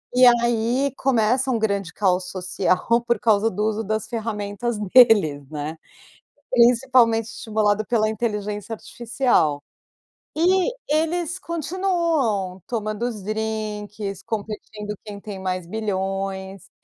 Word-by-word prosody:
E 255 0 +7
aí 240 +3 +2
começa 255 0 +1
um 245 - +2
grande 200 -5 -1
caos 185 -1 0
social 185 0 0 0.3
por 235 -3 +2
causa 220 0 +3
do 210 +2 -3
uso 220 0 -1
das 215 +1 -2
ferramentas 220 0 -3 0.2
deles, 185 - +5
né? 150 +1 -5 0.7
Principalmente 240 -2 +4
estimulado 215 -1 0
pela 215 -2 +1
inteligência 210 -1 -3
artificial, 230 - 0 0.7
e 370 +6 +3 0.2
eles 325 +3 0
continuam 330 - -1
tomando 215 -2 -3
os 215 -5 -6
drinques, 210 -2 -4
competindo 210 -1 -5
quem 205 -1 -8
tem 200 -1 -8
mais 185 -1 -3
bilhões, 195 -1 -3
215 Hz, 110 wpm, -23 LUFS, 200-240 Hz, 0.7 s, E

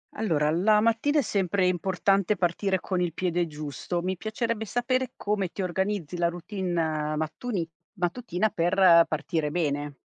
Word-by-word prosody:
Allora 155 -8 +1
la 210 +5 +4
mattina 230 +7 +2
è - - +4
sempre 195 -5 +1
importante 190 +2 +1
partire 185 +1 0
con 185 -1 -2
il 175 -3 -1
piede 175 -1 0
giusto. 150 +3 -4
Mi 185 +1 -2
piacerebbe 220 +2 -2
sapere 255 +3 -1
come 205 -2 -1
ti - - -4
organizzi 185 -2 -2
la 170 0 +2
routine 170 -4 -2
mattuni 165 +5 -3 0.3
mattutina 185 +1 -1
per 175 -1 +5
partire 155 -1 -2
bene. 145 -3 -1
180 Hz, 145 wpm, -27 LUFS, 165-210 Hz, 0.3 s, per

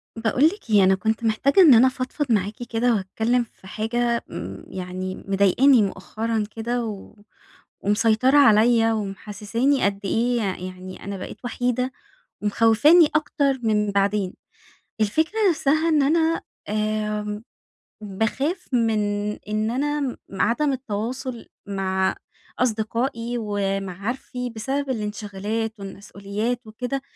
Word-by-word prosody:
باقول 225 +5 +2
لِك 360 - 0
إيه، 205 -2 +5
أنا 190 0 +5
كنت 220 +3 -1
محتاجة 230 - +3
إن 310 -8 +9
أنا 245 +3 +7
فضفض 260 +2 -3
معاكِ 210 +2 0
كده 235 +1 +2
وأتكلم 220 +5 0
في 200 -4 -17
حاجة، 235 +3 -1
امم - - -7
يعني 185 0 -5
مضايقاني 200 +7 +4
مؤخرًا 215 +3 -2
كده، 235 +1 -2
و 210 -2 -8 0.7
ومسيطرة 225 +6 +3
عليا 225 -3 +5
ومحسساني 210 +6 -1
قد 200 0 0
إيه 240 +5 +1
ي 185 -3 -3
يعني 185 0 -10
أنا 200 0 -4
بقيت 185 - -8
وحيدة 250 +1 -1 0.5
ومخوفاني 230 - +5
أكتر 285 -3 +1
من 210 -2 +1
بعدين. 200 -1 +1 0.7
الفكرة 315 - +1
نفسها 315 0 +2
إن 310 -2 +3
أنا 320 +3 +2 0.3
آمم، 210 0 -2 0.6
باخاف 225 - -2
من 225 -3 +2 0.4
إن 215 +1 -2
أنا 285 0 -1 0.2
عدم 235 +9 +1
التواصل 250 +1 -4 0.2
مع 190 -1 0 0.4
أصدقائي 230 +1 -1
ومعارفي، 205 +4 -3
بسبب 265 +5 -3
الانشغالات 215 -1 -3
والمسؤوليات 200 +4 -4
وكده، 250 +5 -4
225 Hz, 115 wpm, -23 LUFS, 205-255 Hz, 0.7 s, إن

